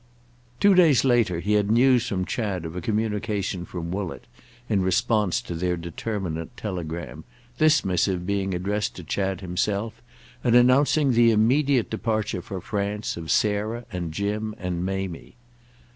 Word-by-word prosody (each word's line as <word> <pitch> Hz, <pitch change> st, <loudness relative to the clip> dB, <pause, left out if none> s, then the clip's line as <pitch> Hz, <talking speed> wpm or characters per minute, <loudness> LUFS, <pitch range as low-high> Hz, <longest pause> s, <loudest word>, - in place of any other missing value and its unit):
Two 200 Hz, -1 st, +6 dB
days 165 Hz, -8 st, +5 dB
later 115 Hz, -9 st, +2 dB
he 105 Hz, +4 st, 0 dB
had 105 Hz, -1 st, +2 dB
news 125 Hz, +1 st, +4 dB
from 95 Hz, -2 st, -1 dB
Chad 95 Hz, -1 st, -3 dB
of 80 Hz, +1 st, -6 dB
a 90 Hz, -, -3 dB
communication 105 Hz, -3 st, -2 dB
from 85 Hz, -2 st, -6 dB
Woollett 95 Hz, -2 st, -4 dB, 0.4 s
in 105 Hz, -4 st, +1 dB
response 105 Hz, 0 st, +1 dB
to -, -, -6 dB
their 90 Hz, +1 st, -1 dB
determinant 85 Hz, -1 st, -5 dB
telegram, 85 Hz, -5 st, -5 dB, 0.4 s
this 155 Hz, -7 st, +4 dB
missive 90 Hz, -1 st, 0 dB
being 95 Hz, -1 st, -1 dB
addressed 100 Hz, +4 st, -2 dB
to 90 Hz, -, -8 dB
Chad 95 Hz, +4 st, -2 dB
himself 100 Hz, +4 st, -2 dB, 0.4 s
and 120 Hz, -1 st, +3 dB
announcing 135 Hz, +3 st, +4 dB
the 120 Hz, -1 st, +5 dB
immediate 125 Hz, +4 st, +2 dB
departure 110 Hz, -4 st, -1 dB
for 95 Hz, +1 st, -6 dB
France 105 Hz, +2 st, -3 dB
of 80 Hz, -2 st, -7 dB
Sarah 110 Hz, +3 st, 0 dB
and 90 Hz, -4 st, -4 dB
Jim 105 Hz, +4 st, -2 dB
and 90 Hz, -2 st, -3 dB
Mamie. 95 Hz, -2 st, -4 dB
100 Hz, 145 wpm, -25 LUFS, 90-115 Hz, 0.4 s, Two